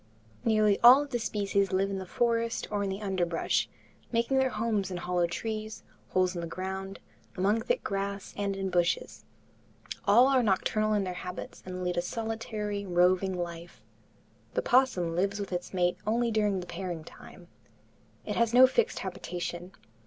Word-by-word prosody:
Nearly 215 -2 +3
all 255 +4 +8
of 285 - -11
the 240 - 0
species 200 -3 0
live 195 +1 +1
in 195 - -3
the 190 - -7
forest 230 +2 0
or 205 -1 0
in 200 - -1
the 195 +2 -4
underbrush, 180 -4 0 0.4
making 235 +3 +2
their 265 0 +3
homes 215 -4 -1
in 180 - -4
hollow 175 0 0
trees, 215 +4 -5 0.3
holes 185 -1 +2
in 175 - -4
the 170 - -4
ground, 190 +2 -5 0.4
among 205 +5 +2
thick - - -1
grass 200 0 -3
and 200 -1 -2
in 195 -1 -3
bushes. 175 -1 0 0.8
All 235 +6 +6
are 270 -2 +4
nocturnal 215 0 +1
in 205 - +1
their 185 -1 -3
habits 180 0 -7
and 185 0 -5
lead 180 0 -1
a - - +3
solitary, 215 0 -4
roving 185 +1 +2
life. 170 -1 -7 0.7
The - - +2
opossum 245 - +2
lives 200 +3 0
with 200 -2 -4
its 175 0 -4
mate 180 -1 +1
only 235 +2 +1
during 210 -3 +1
the - - -8
pairing 175 -2 -5
time. - - -14 0.8
It - - -3
has 235 0 +2
no 255 +1 +10
fixed 450 - +1
habitation. 180 -1 -5
195 Hz, 170 wpm, -29 LUFS, 180-225 Hz, 0.8 s, no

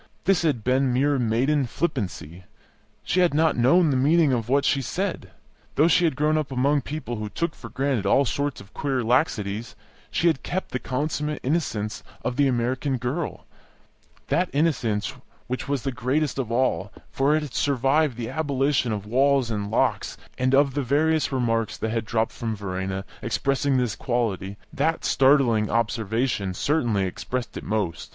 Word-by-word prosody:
This 190 -2 +3
had 145 -10 0
been 130 +2 +2
mere 140 +2 +2
maiden 125 +4 +1
flippancy; 95 - -4 0.6
she 185 - 0
had 175 -4 +3
not 160 0 +3
known 145 +7 +4
the - - +1
meaning 145 +2 +4
of 115 -2 -2
what 140 +2 +3
she 140 - +2
said. 185 - -3 0.5
Though 150 - +5
she 175 +1 +4
had 160 - +1
grown 155 +2 +2
up 150 -3 -4
among 140 +3 +2
people 140 -4 -5
who 105 0 -4
took 170 +7 -2
for - - -10
granted 130 -7 -1
all 140 +7 +4
sorts 140 +3 -2
of 100 +1 -15
queer 135 -3 -1
laxities, 115 -4 0 0.3
she - - -1
had 160 -5 +3
kept 190 +1 -4
the 125 - -2
consummate 150 +3 -2
innocence 125 -8 -1 0.2
of 125 - -1
the 140 +1 +3
American 130 +2 0
girl, 130 +7 -4 0.8
that 180 +1 +1
innocence 130 -7 0 0.3
which 130 +1 -4
was 140 -3 -1
the 135 - -1
greatest 135 +3 -1
of 120 -4 -3
all, 115 -5 0 0.2
for 140 +3 +2
it 155 - 0
had 140 -5 -8
survived 140 0 +1
the 115 -2 -4
abolition 140 -4 0
of 105 -2 -3
walls 130 +2 +2
and 100 -2 -3
locks; - - 0 0.2
and 130 +1 +2
of 140 -1 +3
the 145 - 0
various 150 +3 +1
remarks 115 -4 0
that 110 - -2
had 115 -1 -1
dropped 110 +1 0
from 115 -2 -4
Verena 95 -1 -4 0.2
expressing 135 +3 0
this 125 -4 0
quality 105 -6 -2 0.2
that 165 +1 0
startling 130 -6 +3
observation 110 -3 -1
certainly 120 - +1
expressed 120 +6 -4
it - - -6
most. 105 -6 -2
130 Hz, 170 wpm, -24 LUFS, 115-145 Hz, 0.8 s, Though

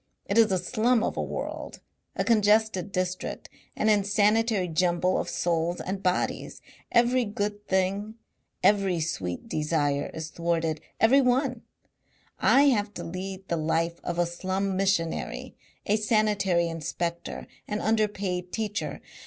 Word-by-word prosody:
It 200 +4 +2
is 220 -3 +5
a 190 - +3
slum 225 +5 +1
of - - -1
a - - -1
world, - - -5 0.4
a - - 0
congested 215 -4 +3
district, 185 -1 -3 0.3
an 215 - 0
insanitary 210 0 +3
jumble 175 +2 +1
of - - -3
souls 170 0 0
and 190 +1 -4
bodies. 185 -1 -1 0.3
Every 245 +1 +4
good 205 -1 -3
thing, 195 +3 0 0.5
every 195 -4 +3
sweet 95 - -3
desire 150 -2 0
is 160 0 -6
thwarted 165 -2 -1 0.2
every 260 +5 +6
one. 250 -1 +1 0.8
I 275 - +5
have 210 -4 0
to - - -5
lead 190 +2 -6
the 170 - -1
life 165 +2 0
of 175 - -3
a 175 - +3
slum 190 +3 -2
missionary, 190 -4 -1 0.3
a 210 - +2
sanitary 210 -5 +2
inspector, 170 +1 -4 0.2
an 210 0 -2
underpaid 200 -5 0
teacher. 210 -2 -3
190 Hz, 135 wpm, -27 LUFS, 170-215 Hz, 0.8 s, every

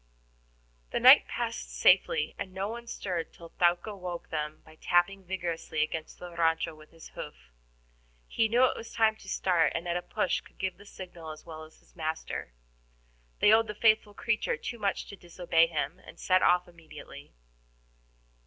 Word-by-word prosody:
The - - -1
night - - +8
passed - - -4
safely, 150 - +4
and 195 -2 -4
no 195 +1 -2
one 235 +1 -7
stirred 180 -7 -4
till 170 -1 -13
Thaouka 175 +4 +1
woke 180 -3 -6
them 150 -1 -4
by 155 0 -17
tapping 190 +3 +2
vigorously 175 -4 -2
against 155 +1 -5
the 175 -1 -9
RANCHO 165 0 +1
with 155 0 -16
his 165 -1 -14
hoof. - - -10 0.8
He 225 - +1
knew 240 +3 +3
it 255 - +3
was 225 - -8
time 220 -1 +4
to - - -12
start, 175 -4 +2
and 170 +2 -3
at 170 - -1
a 175 - 0
push 210 0 -1
could - - -21
give 190 -2 -3
the 205 - -15
signal 175 -5 -9
as 155 0 -9
well 160 -1 -8
as 155 - -20
his - - -27
master. 160 - -4 0.9
They 210 - +7
owed 225 0 +4
the 210 - -5
faithful 215 -1 +3
creature 240 - 0
too 235 - -6
much 200 -2 -1
to - - -10
disobey 175 -2 +1
him, 160 +1 -3
and - - -14
set 185 0 +3
off 180 0 +4
immediately. 155 - -13
175 Hz, 180 wpm, -29 LUFS, 160-200 Hz, 0.9 s, night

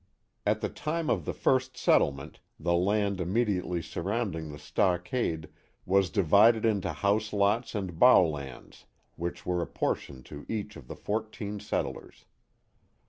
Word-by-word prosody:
At - - +2
the - - -1
time 160 +1 -2
of - - 0
the - - -1
first 130 0 +1
settlement 70 -1 +1 0.2
the 85 +2 0
land 100 +2 +1
immediately 90 -3 0
surrounding 85 -2 -3
the 75 - -8
stockade 90 - -1 0.4
was 95 -1 +3
divided 100 +7 +4
into 105 -4 +1
house 105 +1 0
lots 105 +4 +1
and 95 -5 -4
bouwlands, 75 - +3 0.3
which 85 +1 -5
were 90 -1 0
apportioned 65 -5 -3
to 75 -1 -9
each 105 -1 -4
of 60 - -12
the - - -7
fourteen 105 -1 -4
settlers. 105 - -4
100 Hz, 135 wpm, -29 LUFS, 85-110 Hz, 0.4 s, divided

